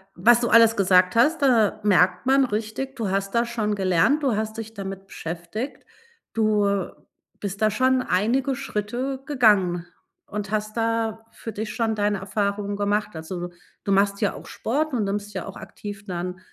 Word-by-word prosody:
was 235 +6 +5
du 235 - 0
alles 230 0 +6
gesagt 185 -1 +4
hast, 300 +8 +3
da 235 -7 +3
merkt 185 0 +3
man 270 +1 +4
richtig, 225 +4 -4
du 225 -6 -2
hast 195 +1 -1
da 235 0 +2
schon 225 -3 -1
gelernt, 195 - +2
du 260 -6 +2
hast 220 +1 -3
dich 225 0 -6
damit 195 -2 -7
beschäftigt. 175 - -6 0.5
Du 205 -3 +2 0.5
bist 200 0 -5
da 215 - +4
schon 255 +4 +2
einige 250 +9 +1
Schritte 255 +2 -3
gegangen 205 - +3 0.4
und 210 -1 -5
hast 215 +1 -2
da 225 -1 -1
für 225 - -7
dich 215 +1 -5
schon 225 -2 0
deine 205 -1 0
Erfahrungen 200 +1 -2
gemacht. 205 0 -1
Also, 175 +2 -5
du - - -13 0.4
du 200 - 0
machst 200 +1 +2
ja 205 - +1
auch - - -10
Sport 295 +6 -2
und 235 -4 +1
nimmst 205 +1 -3
ja - - -4
auch 195 - -8
aktiv 205 -1 -9
dann 180 -1 -4
210 Hz, 175 wpm, -24 LUFS, 195-230 Hz, 0.5 s, alles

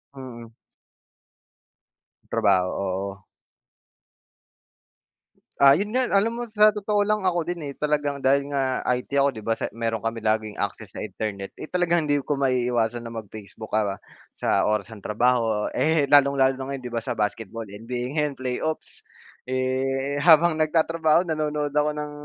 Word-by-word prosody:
Mm. 125 -3 -9 1.8
Trabaho, 95 -2 +2
oo. 95 0 -3 2.4
Ah, 140 0 +8
yun 200 +8 0
nga 255 +3 +1
alam 225 +4 +2
mo 240 - -3
sa 215 -2 +5
totoo 210 0 0
lang 210 -1 0
ako 175 -2 +2
din, 175 +2 -4
eh, 140 - -5
talagang 145 -1 -1
dahil 140 +1 +3
nga 130 -2 -1
IT 125 0 -4
ako 140 0 +4
'di 110 - -8
ba. 115 +1 -1
Sa - - -2
meron 115 -1 -3
kami 115 0 -2
laging 110 -1 0
access 100 0 -5
sa - - -6
internet, 105 -2 -5
eh, - - -6
talagang 175 -1 +1
hindi 145 -1 +1
ko 145 +1 -2
maiiwasan 120 -3 0
na 115 - -7
mag-Facebook 110 -1 -9
ka 105 -2 +1 0.4
sa - - +1
oras 105 +1 -1
ng 105 - -12
trabaho, 115 -1 +1
eh, 160 -2 +2
lalong-lalo 140 -1 +4
na - - -3
ngayon 140 -1 -4
'di 120 - -6
ba 115 - -1
sa - - -4
basketball 110 +1 -3
NBA 115 +5 -5
'yan 150 -2 -1
Playoffs. 130 +5 -4 0.5
Eh, 135 +2 -1
habang 165 +1 +6
nagtatrabaho 160 +1 +2
nanonood 150 -3 -2
ako 150 0 +2
ng 150 0 -4
135 Hz, 155 wpm, -24 LUFS, 115-155 Hz, 2.4 s, Ah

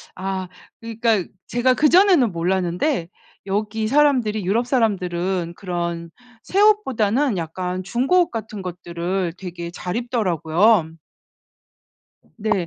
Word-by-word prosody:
아 190 -1 -4 0.3
그러니까 225 -4 0 0.2
제가 250 +1 +2
그전에는 310 - +5
몰랐는데 180 - 0 0.4
여기 215 +2 -1
사람들이 250 -7 +2
유럽 220 +6 +1
사람들은 185 -7 0
그런 170 -2 -4 0.3
새 390 - 0
옷보다는 265 - +2
약간 180 +3 -4
중고 255 - +2
옷 345 - -4
같은 220 -2 -6
것들을 175 0 -3
되게 170 -2 -6
잘 180 +2 -5
입더라고요. 205 - +2 1.5
네. 215 -5 -1
200 Hz, 250 characters per minute, -21 LUFS, 180-240 Hz, 1.5 s, 그전에는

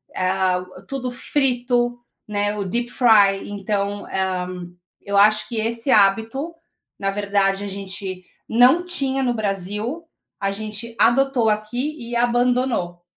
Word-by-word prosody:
ah, 185 -1 +1 0.2
tudo 255 -2 -4
frito, 245 -2 0 0.3
né, 205 0 -1
o 205 - -2
deep 235 +6 -2
fry, 205 -7 +4
então, 205 0 -3
ah, 185 -1 -1 0.5
eu 200 0 -2
acho 215 +1 +4
que 235 - -4
esse 230 +4 0
hábito, 225 +10 +2 0.5
na 195 -1 0
verdade, 200 -1 0
a - - -4
gente 190 -1 -5 0.2
não 255 +10 +4
tinha 270 -6 -1
no 245 -1 +1
Brasil, 210 - -2 0.3
a 195 - -1
gente 215 +3 -6
adotou 255 -1 +3
aqui 240 +8 -2
e 240 0 -6
abandonou. 240 -7 +1
215 Hz, 130 wpm, -21 LUFS, 195-245 Hz, 0.5 s, fry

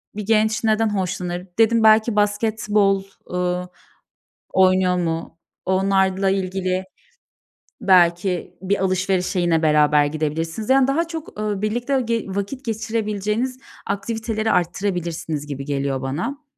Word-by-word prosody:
bir 210 -1 -5
genç 220 +1 +2
neden 220 0 +2
hoşlanır? 180 -1 -3
Dedim, 225 0 +4
"Belki 220 +1 +5
basketbol, 210 -1 +1 0.3
ııı, 180 0 -1 0.8
oynuyor 185 -1 +3
mu?" 165 -1 -3 0.3
Onlarla 190 0 +2
ilgili 185 -1 -1 1.0
belki 180 -1 +2
bir 195 +1 0
alışverişe 185 0 0
yine 170 -2 +2
beraber 150 -1 +4
gidebilirsiniz, 160 - -3
yani, 265 -1 +5
daha 325 +5 +1
çok, 320 -9 -7
ııı, 210 -2 -2
birlikte 240 +5 0
ge 230 -2 -1
vakit 200 +7 -4
geçirebileceğiniz 220 +2 -2 0.3
aktiviteleri 220 +2 -2
artırabilirsiniz 175 -4 -2
gibi 140 -2 -5
geliyor 140 -1 -2
bana. 180 - -4
195 Hz, 110 wpm, -21 LUFS, 180-220 Hz, 1.0 s, Belki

